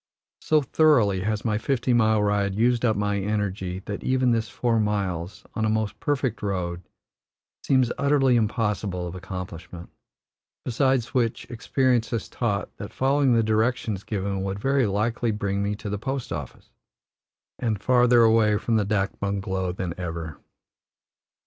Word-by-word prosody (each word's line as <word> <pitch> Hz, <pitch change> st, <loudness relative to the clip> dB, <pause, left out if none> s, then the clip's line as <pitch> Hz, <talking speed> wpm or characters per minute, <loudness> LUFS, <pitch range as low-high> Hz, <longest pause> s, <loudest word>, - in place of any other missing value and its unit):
So 155 Hz, -2 st, +2 dB
thoroughly 125 Hz, -10 st, +3 dB
has 110 Hz, 0 st, -1 dB
my 105 Hz, -2 st, +1 dB
fifty 125 Hz, +1 st, 0 dB
mile 110 Hz, -2 st, +3 dB
ride 100 Hz, -1 st, +1 dB
used 120 Hz, +2 st, +2 dB
up 110 Hz, -3 st, +3 dB
my 100 Hz, 0 st, 0 dB
energy 95 Hz, -2 st, -2 dB
that 100 Hz, -, -5 dB
even 130 Hz, -1 st, +2 dB
this 115 Hz, -1 st, 0 dB
four 115 Hz, -1 st, 0 dB
miles, 100 Hz, -4 st, -2 dB
on 110 Hz, -, -2 dB
a 110 Hz, -, +2 dB
most 110 Hz, -1 st, -1 dB
perfect 130 Hz, -6 st, -1 dB
road, 90 Hz, -4 st, -2 dB, 0.8 s
seems 130 Hz, -3 st, +2 dB
utterly 140 Hz, -2 st, +3 dB
impossible 105 Hz, -5 st, -1 dB
of 85 Hz, -, -6 dB
accomplishment; 90 Hz, -2 st, -8 dB, 0.7 s
besides 130 Hz, -1 st, +1 dB
which, 120 Hz, -3 st, 0 dB
experience 120 Hz, 0 st, +1 dB
has 115 Hz, -, -3 dB
taught 100 Hz, -6 st, -2 dB
that -, -, -7 dB
following 135 Hz, 0 st, +2 dB
the 115 Hz, -, +3 dB
directions 110 Hz, -2 st, 0 dB
given 100 Hz, -1 st, -2 dB
would 95 Hz, 0 st, -3 dB
very 135 Hz, +2 st, +1 dB
likely 115 Hz, +4 st, 0 dB
bring 100 Hz, -2 st, -1 dB
me 100 Hz, +1 st, -1 dB
to 105 Hz, -, -8 dB
the 100 Hz, 0 st, -3 dB
post 135 Hz, +2 st, -4 dB
office -, -, -8 dB, 0.9 s
and 110 Hz, -4 st, -1 dB
farther 120 Hz, +1 st, +4 dB
away 110 Hz, -2 st, +4 dB
from 115 Hz, +1 st, 0 dB
the 105 Hz, -, +1 dB
dak 100 Hz, -2 st, -1 dB
bungalow 95 Hz, -2 st, -2 dB
than 90 Hz, -1 st, -4 dB
ever. 80 Hz, -3 st, -5 dB
110 Hz, 150 wpm, -25 LUFS, 100-120 Hz, 0.9 s, farther